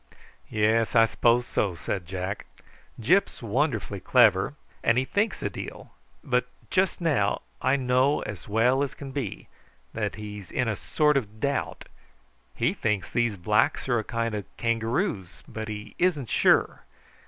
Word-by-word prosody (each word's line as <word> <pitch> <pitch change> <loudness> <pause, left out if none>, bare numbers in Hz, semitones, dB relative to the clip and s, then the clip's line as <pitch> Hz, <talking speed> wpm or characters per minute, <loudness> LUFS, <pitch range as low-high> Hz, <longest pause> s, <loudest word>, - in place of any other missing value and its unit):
"Yes, 110 +2 +2
I 115 -1 +7
s'pose 120 +2 +2
so," 95 -7 -1
said 90 +1 -4
Jack. 95 +2 -4 0.5
"Gyp's 175 - +2
wonderfully 115 -3 -1
clever, - - +4 0.3
and 115 +1 +3
he 130 - +2
thinks 205 +9 -1
a - - +1
deal; - - -8 0.3
but - - +1 0.2
just 190 -1 +1
now, 130 -12 +1 0.2
I 130 +2 +3
know 130 +2 +2
as 100 -4 -7
well 120 +5 +3
as 140 - -2
can 140 -2 -8
be, 130 -8 -5 0.5
he's 105 -3 -5
in 125 - -1
a 110 - 0
sort 150 +6 +2
of 110 -4 -4
doubt. 140 +3 -2 0.7
He - - +1
thinks 105 -4 -1
these 120 -4 +1
blacks 105 +8 +1
are 120 -3 +2
a - - -3
kind 115 0 -2
of 105 -2 -3
kangaroos, 115 - -1
but 110 0 -6
he 105 -1 -7
isn't 155 - +1
sure. - - +3
115 Hz, 150 wpm, -26 LUFS, 105-135 Hz, 0.7 s, I